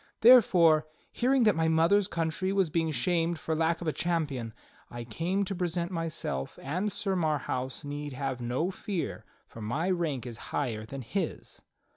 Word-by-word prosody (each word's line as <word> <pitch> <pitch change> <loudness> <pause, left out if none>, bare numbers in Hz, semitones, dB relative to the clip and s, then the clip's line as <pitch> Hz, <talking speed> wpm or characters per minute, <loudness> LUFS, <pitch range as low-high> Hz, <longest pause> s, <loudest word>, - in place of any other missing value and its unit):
Therefore, 175 -10 +7 0.2
hearing 255 +1 +2
that 210 -3 +4
my 160 0 +1
mother's 165 +5 +4
country 165 +3 -1
was 195 -5 +1
being 165 0 +1
shamed 165 +4 0
for 160 - -3
lack 165 +2 +1
of 170 - -4
a 155 - +1
champion, 150 -9 -1 0.4
I 120 0 -6
came 175 - -1
to 195 - -3
present 175 -1 -2
myself; 165 - -3
and 180 +9 -2
Sir 195 0 -2
Marhaus 145 -5 -1
need 145 0 -5
have 130 -1 -3
no 125 +10 -1
fear, 190 -2 -4 0.2
for 115 - -11
my 150 - -1
rank 155 -9 -1
is 120 -3 -6
higher 110 -6 -2
than 135 +2 -6
his." 195 - -4
160 Hz, 165 wpm, -29 LUFS, 135-180 Hz, 0.4 s, Therefore